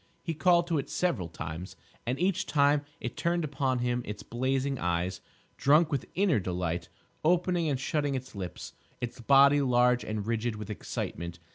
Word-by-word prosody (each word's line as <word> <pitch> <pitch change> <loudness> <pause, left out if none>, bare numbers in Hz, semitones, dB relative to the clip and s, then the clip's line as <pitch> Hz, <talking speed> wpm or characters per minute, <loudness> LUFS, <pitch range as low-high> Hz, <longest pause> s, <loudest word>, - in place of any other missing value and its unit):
He 165 - -2
called 170 +3 +4
to 165 -3 0
it 140 - -5
several 135 - 0
times, 80 +2 -7 0.3
and 125 +3 -1
each 190 +1 +1
time 145 0 +3 0.2
it 120 - -5
turned 170 0 0
upon 135 -3 0
him 120 0 0
its 105 -1 -6
blazing 130 +2 -1
eyes, 90 +1 -1 0.4
drunk 150 +3 +4
with 140 -4 -1
inner 185 - +3
delight, 90 -2 -2 0.3
opening 175 0 +2
and 135 -3 0
shutting 145 +1 0
its 130 0 -5
lips, 95 -4 -6 0.3
its 125 +1 -5
body 140 +3 +6
large 125 -1 +3
and 105 -1 -3
rigid 115 0 -1
with 105 0 -6
excitement. 85 -4 -5
130 Hz, 165 wpm, -29 LUFS, 105-150 Hz, 0.4 s, body